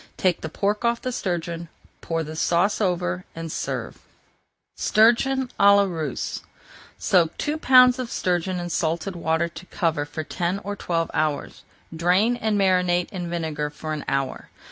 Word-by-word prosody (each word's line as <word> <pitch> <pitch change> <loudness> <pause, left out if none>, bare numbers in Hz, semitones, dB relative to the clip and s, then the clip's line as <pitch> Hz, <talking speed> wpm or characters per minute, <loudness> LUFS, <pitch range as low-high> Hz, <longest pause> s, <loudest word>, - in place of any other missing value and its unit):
Take 185 -2 +1
the 160 - -4
pork 205 +7 -1
off 235 0 +1
the 255 - -3
sturgeon, 170 -5 -3 0.3
pour 165 -1 -2
the 155 +1 -7
sauce 175 +7 +1
over, 130 - 0
and 165 -1 -5
serve. - - -3
[Page - - -11
407] 250 +4 +4
STURGEON - - -22
À 200 0 +7
LA 200 - +5
RUSSE 160 -7 -4 0.6
Soak 170 -4 +2
two 300 +1 -2
pounds 255 -2 +6
of 250 -2 -3
sturgeon 180 0 -1
in 175 0 -4
salted 170 +4 -1
water 165 0 0
to 170 +2 -11
cover 160 -4 -1
for 155 +2 -5
ten 175 +4 -2
or 205 +1 -4
twelve 165 -4 -2
hours. 150 -2 -1 0.3
Drain 180 +8 +3
and 220 -3 0
marinate 180 -2 +2
in 180 -3 -5
vinegar 160 -3 -2
for 155 +1 -6
an 150 - -4
hour. 135 -1 -2
175 Hz, 165 wpm, -24 LUFS, 160-200 Hz, 0.6 s, À